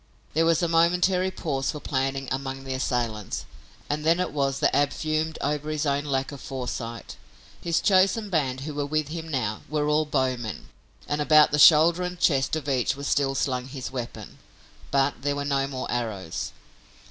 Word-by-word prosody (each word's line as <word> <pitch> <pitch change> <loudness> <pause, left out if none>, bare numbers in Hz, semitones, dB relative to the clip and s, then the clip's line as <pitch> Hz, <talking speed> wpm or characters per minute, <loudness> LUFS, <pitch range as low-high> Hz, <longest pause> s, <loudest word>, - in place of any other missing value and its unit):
There 165 +2 +3
was 165 +1 +3
a - - +3
momentary 180 +3 +3
pause 140 -7 -2
for 150 - -3
planning 135 -1 -2
among 135 0 -3
the 135 -1 -4
assailants, 120 -5 -2 0.4
and 150 +1 -2
then 165 +2 +3
it 180 - -1
was 135 -2 0
that - - +2
Ab 145 0 +3
fumed 155 0 -2
over 150 +1 -1
his 155 0 -1
own 140 0 0
lack 135 -1 -1
of 140 - -9
foresight. 120 -3 -5 0.4
His 170 -1 +1
chosen 195 +2 +3
band 135 -6 0
who 150 +2 -5
were 145 0 -2
with 155 0 -1
him 165 0 -5
now 125 -8 -2
were 150 0 0
all 150 +1 +2
bowmen, 130 -6 -2 0.4
and 145 0 -1
about 150 0 +6
the 150 - +1
shoulder 165 +3 +7
and 180 -1 -4
chest 135 -3 +2
of 155 -2 -4
each 130 -1 +1
was 140 +1 -7
still 135 0 +1
slung 130 -2 -1
his 135 -1 -6
weapon, 125 -2 -7 0.5
but 140 0 +1
there 145 0 0
were 145 0 -3
no 135 -1 +1
more 130 -2 -4
arrows. 110 -8 -3
145 Hz, 185 wpm, -26 LUFS, 130-155 Hz, 0.5 s, shoulder